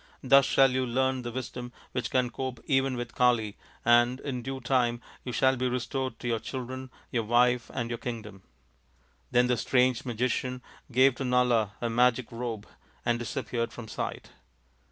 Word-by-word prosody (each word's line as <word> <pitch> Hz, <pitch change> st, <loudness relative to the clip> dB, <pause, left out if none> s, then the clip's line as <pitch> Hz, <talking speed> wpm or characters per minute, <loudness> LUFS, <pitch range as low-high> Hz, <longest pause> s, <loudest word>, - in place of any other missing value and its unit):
Thus 135 Hz, 0 st, +6 dB
shall 135 Hz, -1 st, +5 dB
you 130 Hz, 0 st, +1 dB
learn 130 Hz, +1 st, 0 dB
the 120 Hz, -1 st, -5 dB
wisdom 125 Hz, 0 st, -5 dB, 0.2 s
which 125 Hz, -, -2 dB
can 125 Hz, -2 st, +1 dB
cope 130 Hz, -2 st, -4 dB
even 135 Hz, -2 st, +2 dB
with 120 Hz, -1 st, -5 dB
Kali, 120 Hz, -4 st, +2 dB, 0.3 s
and 120 Hz, +2 st, +5 dB
in 130 Hz, -3 st, -3 dB
due 135 Hz, +2 st, -5 dB
time 120 Hz, -2 st, +1 dB, 0.2 s
you 125 Hz, -, -4 dB
shall 130 Hz, +2 st, +3 dB
be 130 Hz, 0 st, 0 dB
restored 125 Hz, 0 st, -2 dB
to 120 Hz, -, -6 dB
your 115 Hz, -2 st, +1 dB
children, 130 Hz, +2 st, -6 dB, 0.2 s
your 120 Hz, -, +1 dB
wife, 120 Hz, +2 st, +2 dB
and 120 Hz, -1 st, -3 dB
your 120 Hz, -, -3 dB
kingdom." 110 Hz, -5 st, -6 dB, 0.9 s
Then 125 Hz, 0 st, +4 dB
the 125 Hz, -1 st, +1 dB
strange 125 Hz, -1 st, +2 dB
magician 125 Hz, +1 st, -2 dB, 0.3 s
gave 130 Hz, +2 st, +5 dB
to -, -, -3 dB
Nala 125 Hz, -4 st, +2 dB
a 120 Hz, -, 0 dB
magic 125 Hz, 0 st, +2 dB
robe 115 Hz, -3 st, -4 dB, 0.4 s
and 120 Hz, 0 st, +1 dB
disappeared 120 Hz, -1 st, -3 dB
from 120 Hz, -2 st, -9 dB
sight. -, -, -5 dB
125 Hz, 170 wpm, -28 LUFS, 120-130 Hz, 0.9 s, Thus